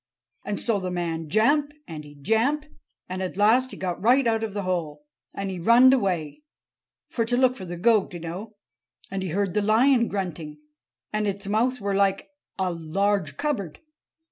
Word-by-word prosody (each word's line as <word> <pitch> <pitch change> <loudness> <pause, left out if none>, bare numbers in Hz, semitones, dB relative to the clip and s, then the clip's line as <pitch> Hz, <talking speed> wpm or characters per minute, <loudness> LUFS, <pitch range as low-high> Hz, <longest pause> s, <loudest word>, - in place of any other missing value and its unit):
And 205 - -3
so 225 -4 +1
the 185 -1 -3
man 165 -3 -3
jamp, 285 - +2
and 155 -2 -7
he 145 0 -14
jamp, 225 - +1 0.4
and 185 +1 -4
at 185 0 -4
last 235 +5 +4
he - - -9
got 180 -2 -3
right 250 +5 +4
out 225 -1 +1
of 215 -2 -4
the 205 - -2
hole. 160 -5 -3 0.3
And 195 -1 -3
he 185 - -5
runned 240 +8 +6
away—for 200 - -4
to 245 +2 0
look 255 0 +3
for 190 - -8
the 175 0 -6
goat, 215 +2 +3
oo - - -5
know. 185 +7 -7 0.6
And 195 0 -3
he 190 - -3
heard 195 +2 -1
the 210 - +1
lion 235 +4 +4
grunting. 170 -6 -4 0.6
And 215 0 0
its 200 0 -3
mouth 235 +5 +1
were 200 -1 -2
like 195 +3 +1 0.3
a 185 -2 0
large 170 -1 -1
cupboard. 220 - -3
200 Hz, 180 wpm, -25 LUFS, 175-230 Hz, 0.6 s, runned